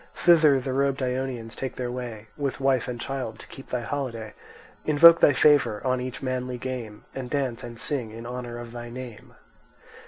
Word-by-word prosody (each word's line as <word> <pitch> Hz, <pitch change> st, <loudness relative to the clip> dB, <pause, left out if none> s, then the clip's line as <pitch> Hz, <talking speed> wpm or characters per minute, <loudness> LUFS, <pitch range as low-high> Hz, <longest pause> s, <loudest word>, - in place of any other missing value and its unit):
Thither 155 Hz, -5 st, +5 dB
the 130 Hz, 0 st, -3 dB
robed 140 Hz, 0 st, +1 dB
Ionians 125 Hz, -3 st, -3 dB
take 130 Hz, -2 st, -4 dB
their 125 Hz, -1 st, -3 dB
way 120 Hz, -4 st, -6 dB
With 140 Hz, -2 st, -3 dB
wife 135 Hz, -2 st, +2 dB
and 120 Hz, -1 st, -4 dB
child 130 Hz, -4 st, -4 dB
to -, -, -11 dB
keep 135 Hz, -, -12 dB
thy 125 Hz, -, -1 dB
holiday, 120 Hz, -4 st, -4 dB, 0.5 s
Invoke 165 Hz, +3 st, +8 dB
thy -, -, +6 dB
favour 145 Hz, -6 st, +4 dB
on 130 Hz, -1 st, +1 dB
each 130 Hz, +1 st, -6 dB
manly 125 Hz, -1 st, -2 dB
game, 120 Hz, -4 st, -6 dB
And 130 Hz, -2 st, -5 dB
dance 135 Hz, -5 st, -2 dB
and 120 Hz, -1 st, -8 dB
sing 130 Hz, -7 st, -1 dB
in 115 Hz, +2 st, -9 dB
honour 120 Hz, -1 st, -5 dB
of 120 Hz, -1 st, -8 dB
thy 120 Hz, 0 st, -7 dB
name. 120 Hz, -3 st, -9 dB
125 Hz, 185 wpm, -26 LUFS, 120-135 Hz, 0.5 s, Invoke